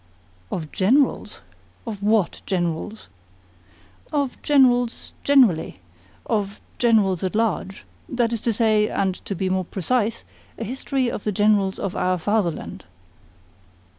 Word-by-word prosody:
"Of 155 -3 -4
Generals? 250 +9 +1 0.4
Of 215 -4 -6
WHAT 210 -3 +1
Generals?" 180 +3 -2 1.0
"Of 285 -4 -1
Generals 245 -5 +3
generally 255 - +3 0.5
of 205 -2 -2 0.2
Generals 210 -7 +3
at 185 +2 -2
large. 210 -3 -1 0.2
That 240 -2 0
is 225 - -2
to 235 - +1
say, 215 -1 +3
and 190 -1 0
to 200 - -3
be 190 +2 -1
more 185 0 0
precise, 220 +5 -1 0.3
a - - -4
history 260 +3 -2
of - - -5
the 210 - 0
Generals 205 -1 +2
of 195 0 -4
our 185 0 +1
fatherland." 185 -2 -2
210 Hz, 125 wpm, -23 LUFS, 190-235 Hz, 1.0 s, Generals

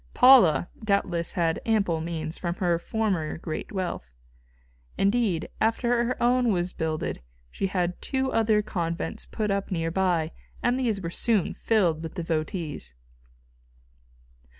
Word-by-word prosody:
Paula, 245 - +7 0.2
doubtless, 185 -5 0
had 165 -2 0
ample 200 -8 +1
means 160 -1 -4
from 175 -1 -3
her 175 -3 +1
former 190 -6 -1
great 160 -1 -5
wealth. 175 - -4 0.8
Indeed, 200 -4 +1
after 235 +2 +2
her 250 - -1
own 245 -1 +3
was 180 -1 -1
builded 160 -1 -3 0.3
she 195 - -1
had 180 -2 -2
two 265 -1 -1
other 220 -2 +3
convents 170 -4 -3
put 210 -2 -2
up 200 0 -1
near 165 -3 -1
by, 175 -3 +1 0.3
and 245 +2 +2
these 225 -6 0
were 165 - -3
soon 215 -1 +1
filled 180 -8 +1
with 160 -1 -7
devotees. 160 - -3
185 Hz, 130 wpm, -26 LUFS, 165-220 Hz, 0.8 s, Paula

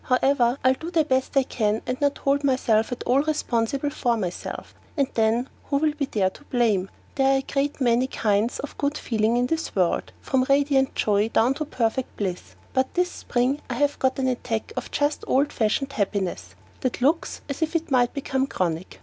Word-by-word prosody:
However, 255 -1 +2
I'll 260 +1 +5
do 320 +5 -7
the 335 -3 +3
best 260 0 0
I 270 - +6
can 215 -4 -1
and 255 +2 -3
not 285 0 +2
hold 280 +1 +1
myself 255 -4 +2
at 245 - -4
all 260 +3 +3
responsible 280 -2 -1
for 240 -3 0
myself, 185 -5 -5 0.2
and 280 -2 +2
then 225 +3 +2 0.2
who 280 - 0
will 305 +1 +1 0.2
there 195 -3 +1
be - - -24
to - - -19
blame? 215 -7 +1 0.2
There 270 -1 +3
are - - +3
a 270 - -2
great 280 +1 -1
many 245 0 +3
kinds 215 -1 0
of 290 - -7
good 285 +1 0
feeling 225 0 +1
in 245 - +2
this 325 +5 -2
world, 180 -3 +1
from 260 -1 0
radiant 275 -1 +3
joy 210 +1 +2
down 235 +3 +3
to 305 +2 -4
perfect 250 -2 -2
bliss; 185 -3 -4 0.2
but 260 0 +1
this 360 0 +1
spring 255 +4 -1
I 245 - -2
have 290 +3 +1
got 260 0 +1
an 265 -1 0
attack 235 -3 -2
of 255 - -4
just 290 +1 0
old 280 +3 +2
fashioned 260 +5 0
happiness 185 - -2 0.2
that 255 -1 -2
looks 310 +5 +1
as 280 +2 -5
if 320 +1 -1
it 325 -2 -1
might 245 -2 +3
become 270 -1 -1
chronic. 175 -5 -3
260 Hz, 200 wpm, -24 LUFS, 225-280 Hz, 0.2 s, I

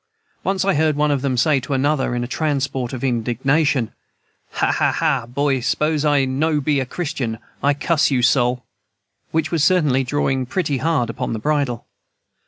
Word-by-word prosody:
Once 190 -1 0
I 195 - +3
heard 155 0 +2
one 150 0 +1
of 140 -2 0
them 130 -2 -1
say 140 +3 +3
to 130 +2 -5
another, 135 -2 0
in 120 - -1
a - - -4
transport 135 -4 -2
of 130 -1 -6
indignation, 130 +2 +1 0.6
"Ha - - +1
a - - +1
a, 115 - +1
boy, 135 +2 0
s'pose 150 +4 0
I 145 -3 +3
no 150 +4 0
be 145 0 +1
a 130 - -2
Christian, 140 -8 -3 0.2
I 145 0 +2
cuss 150 +1 +1
you 130 -3 +1
sol" 125 0 +2 0.6
which 160 -1 -1
was 165 -4 +1
certainly 150 -7 +3
drawing 130 -1 -1
pretty 150 -3 -1
hard 150 -7 0
upon 115 - -4
the 110 - -3
bridle. 140 -2 -1
140 Hz, 180 wpm, -20 LUFS, 125-150 Hz, 0.6 s, I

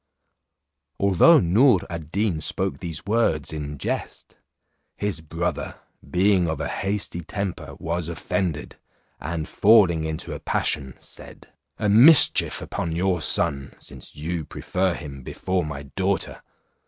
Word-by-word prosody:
Although 100 - +6
Noor 100 +4 +4
ad 80 -3 -7
Deen 100 -5 0
spoke 70 - -1
these 85 -4 -6
words 100 -9 0
in 75 -1 -5
jest, - - -5 0.6
his 100 -5 -2
brother 85 +2 -3 0.3
being 90 0 +2
of 80 -2 -3
a 80 - -2
hasty 100 -3 -2
temper, 100 +2 -5
was 85 0 -3
offended, 85 -2 -3 0.4
and 80 0 -4
falling 100 -7 +4
into 80 0 -4
a - - -6
passion 65 -4 -1
said, - - -11 0.3
"A 105 - -1
mischief 125 +9 +6
upon 85 -2 -4
your 90 0 0
son, 70 -2 +1
since - - -10
you 80 +2 -4
prefer 95 +4 -2
him 70 -4 -8
before 90 +7 -2
my 70 -2 -6
daughter. 95 +7 -2
85 Hz, 130 wpm, -24 LUFS, 80-100 Hz, 0.6 s, Although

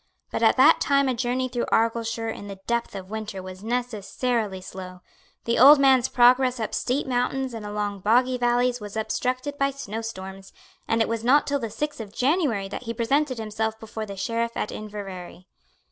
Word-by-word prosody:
But - - -2
at - - +4
that - - +6
time 280 -1 +3
a 260 - +1
journey 250 +1 -1
through 245 -1 -3
Argyleshire 225 0 0
in 205 - -8
the 195 -1 -8
depth 235 -3 -1
of 190 0 -8
winter 215 -3 -5
was 185 +1 -9
necessarily 230 -2 -2
slow. 185 -1 -9 0.4
The 235 - +1
old 285 +5 +10
man's 265 -2 +4
progress 250 +1 +4
up 220 - -3
steep 265 +4 -1
mountains 255 0 -1
and 220 -2 -6
along 205 -1 -3
boggy 250 +5 +2
valleys 245 +1 +2
was 205 +1 -7
obstructed 255 +5 -2
by 275 0 +3
snow 225 -5 -6
storms; 190 -3 -8 0.3
and 225 0 +2
it - - -3
was 230 0 -3
not 275 +5 +4
till 285 0 0
the 230 -3 -4
sixth 295 +3 -4
of 210 0 -10
January 260 - +1
that 205 - -7
he 230 0 -4
presented 260 +3 +1
himself 220 0 -3
before 220 0 -6
the 200 -1 -8
Sheriff 230 +3 -2
at - - -2
Inverary. 195 -4 -8
230 Hz, 190 wpm, -25 LUFS, 210-255 Hz, 0.4 s, old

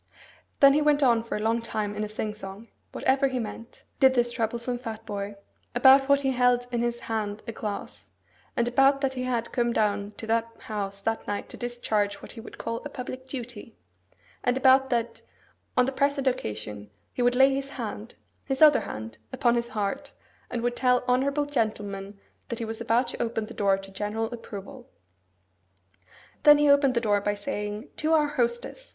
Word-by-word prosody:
Then 275 -1 +8
he 300 - +3
went 295 -1 +3
on 235 -3 +4
for 230 - -4
a - - -4
long 225 +2 +1
time 215 -2 -3
in 210 +1 -3
a 210 - -4
sing 215 0 -3
song 205 +2 -9 0.2
(whatever 270 +1 +2
he 260 -1 -2
meant), 230 0 -7
did 265 -1 +6
this 240 -1 +2
troublesome 235 +1 -2
fat 225 -2 -7
boy, 205 -1 -4 0.4
about 270 +2 +7
that 280 0 +4
he 270 -1 +1
held 245 -1 +3
in 240 -1 0
his 240 0 -1
hand 215 -2 -3
a - - -2
glass; 150 - -6 0.5
and 235 - +2
about 270 +3 +4
that 270 -2 0
he 255 - -4
had 235 -2 -1
come 240 -1 +1
down 205 -2 0
to - - -4
that 230 +1 +1
house 200 -2 -4
that 225 +2 -2
night 205 0 -3
to - - -9
discharge 220 -4 -1
what - - -11
he 225 - -9
would - - -11
call 230 0 -3
a 290 - -6
public 255 -1 -7
duty; 240 -4 -8 0.7
and 245 +1 +2
about 265 0 +5
that, 235 -1 -1 0.6
on 250 - +5
the 265 - -1
present 280 0 0
occasion, 105 - -3 0.2
he - - -3
would 245 0 +3
lay 270 +1 +6
his 275 0 -3
hand 230 -4 -6 0.3
(his 265 -1 -3
other 300 -2 +8
hand) 110 0 -7
upon 240 -1 +2
his 235 0 0
heart, 205 -2 -3 0.4
and 235 -1 -3
would 240 0 0
tell 250 0 +3
honourable 275 +4 +2
gentlemen 205 -6 -3 0.3
that 235 - -3
he 230 - -3
was 225 +1 -5
about 235 +2 +2
to - - -5
open 225 -2 -1
the - - -10
door 195 -1 +2
to 195 0 -10
general 215 +4 -3
approval. 240 +3 -9 1.5
Then 295 0 +8
he 295 -1 +5
opened 280 -2 +4
the 235 - +2
door 205 -3 +2
by 205 0 0
saying, 205 +3 -4
'To 315 +1 +1
our 305 -2 +4
hostess! 240 - -2
235 Hz, 195 wpm, -27 LUFS, 210-260 Hz, 1.5 s, Then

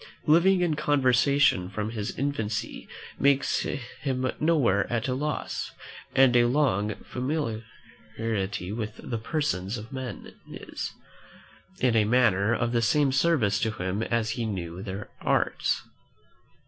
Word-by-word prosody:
Living 180 +4 +5
in 170 -3 +1
conversation 140 -7 +3
from 105 +2 -3
his 105 -3 -4
infancy 115 -6 -3 0.3
makes 140 0 +3
him 130 0 -3
nowhere 135 -13 +2
at 115 0 0
a 130 - 0
loss; 150 +3 -3 0.4
and 130 -2 +6
a 120 -1 +6
long 115 -6 +1
familiarity 110 - -4
with 110 -1 -4
the 115 -2 -4
persons 110 - -1
of 110 +5 -9
men 130 -2 -6 0.2
is, - - -6 0.9
in 125 -2 +3
a 110 - +5
manner, 110 -3 +3
of 120 0 0
the 120 -1 +2
same 140 +5 +3
service 130 -8 +2
to 115 - +1
him 95 -1 -3
as 115 -1 0
if - - -3
he 120 - -1
knew 90 -3 -4
their 100 +1 -6
arts. - - +1
120 Hz, 135 wpm, -27 LUFS, 105-140 Hz, 0.9 s, and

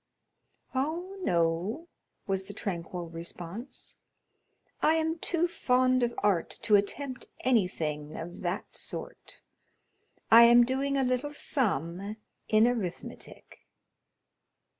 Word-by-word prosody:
"Oh, 325 +8 -2
no," 175 - 0 0.4
was 195 -1 -1
the 205 - -8
tranquil 175 -3 -4
response; 175 +8 -8 0.8
"I 315 - +4
am 320 +1 0
too 345 +1 +1
fond 255 -5 +2
of 240 -1 0
art 195 -5 +2
to 210 - +5
attempt 255 +6 -1
anything 160 -11 0
of 175 +2 -7
that 175 +1 -3
sort. - - -4 0.9
I 230 +1 +10
am 240 +1 +8
doing 275 +2 0
a 270 - +2
little 255 +4 -1
sum 200 - 0 0.3
in 220 +1 +5
arithmetic." 220 -8 -5
225 Hz, 105 wpm, -29 LUFS, 175-265 Hz, 0.9 s, I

